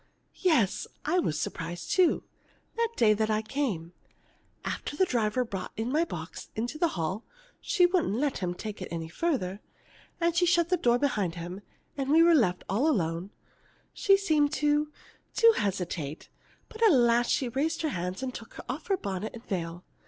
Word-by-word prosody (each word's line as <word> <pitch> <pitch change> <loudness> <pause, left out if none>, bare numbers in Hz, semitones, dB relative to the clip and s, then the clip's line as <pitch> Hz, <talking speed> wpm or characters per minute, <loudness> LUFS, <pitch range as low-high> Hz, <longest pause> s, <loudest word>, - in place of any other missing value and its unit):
"Yes, 305 - +2 0.2
I 355 +4 +2
was 155 - 0
surprised 175 +1 -4
too, 365 -2 +3 0.5
that 465 0 +2
day 215 -2 +5
I 215 0 +1
came. 215 - -2 0.7
After 290 - -4
the 375 - +4
driver 235 -5 +1
had 245 - -4
brought 190 - -5
my 270 +9 +1
box - - -7
into 240 +7 -3
the 340 - +4
hall 180 +7 -2 0.4
(she 360 -3 +3
wouldn't 355 - +1
let 280 +3 0
him 180 -2 -2
take 210 +1 -6
it 185 - -4
any 165 -1 -4
farther), 200 - -2 0.6
and 340 -1 +1
she 355 +1 +4
had - - +3
shut 340 -1 +3
the 365 - +3
door 240 -7 +3
behind 210 -11 0
him 175 +3 -6 0.4
and 270 -1 -2
we 320 +3 +6
were 340 0 +6
left 195 - +3
alone, 190 - 0 0.6
she 390 -1 +4
seemed 305 -7 +2
to 295 0 +1 0.4
to 460 0 +7
hesitate, 175 -7 -3 0.4
but 445 - -12
at 445 -3 +7
last 240 -3 +4
she 255 - +1
raised 310 +7 -1
her 310 - +1
hands 180 +1 -3
and 255 -1 -3
took 225 -1 -10
off 275 +5 -5
her 390 - +2
bonnet 200 - -4
and 235 - -11
veil. 175 -2 -4
240 Hz, 175 wpm, -29 LUFS, 185-315 Hz, 0.7 s, to